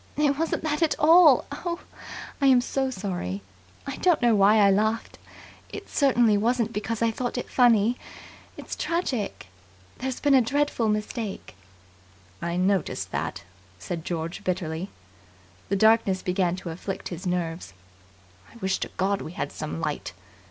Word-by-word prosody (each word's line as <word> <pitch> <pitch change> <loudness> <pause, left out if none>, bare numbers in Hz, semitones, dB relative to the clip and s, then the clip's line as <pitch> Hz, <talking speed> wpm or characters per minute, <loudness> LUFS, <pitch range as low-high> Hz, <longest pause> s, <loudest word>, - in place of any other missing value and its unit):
It 290 -1 +2
wasn't 325 -1 -1
that 300 0 -1
at 320 -2 +2
all. 315 -3 +6
Oh, 340 +4 -3 0.6
I 275 - +4
am 260 -2 +6
so 265 +2 -1
sorry. 180 - -4 0.4
I - - -5
don't 355 -4 +3
know 240 -2 +4
why 200 +1 +5
I 200 -2 +6
laughed. 215 +3 0 0.5
It - - -8
certainly 245 -7 +3
wasn't 230 0 0
because 225 +2 -2
I 230 - +3
thought 245 +2 -3
it 245 - -3
funny. 240 -1 +3 0.6
It's - - -6
tragic. 275 - -2 0.5
There's 260 0 -3
been 290 -1 +3
a 265 - +7
dreadful 275 -2 0
mistake!" 210 0 -3 0.9
"I 170 +1 -2
noticed 190 +1 0
that," - - -3 0.3
said 160 - -5
George 165 0 -4
bitterly. 180 0 -2 0.8
The 200 - +1
darkness 220 -2 +3
began 180 -1 0
to 185 -2 -6
afflict 185 +3 -5
his 180 +2 -6
nerves. 170 - -3 0.8
"I - - -19
wish 190 -4 -1
to - - -3
God 195 +1 +1
we 160 - -7
had - - -4
some 80 +1 -5
light." - - -3
215 Hz, 150 wpm, -26 LUFS, 185-255 Hz, 0.9 s, a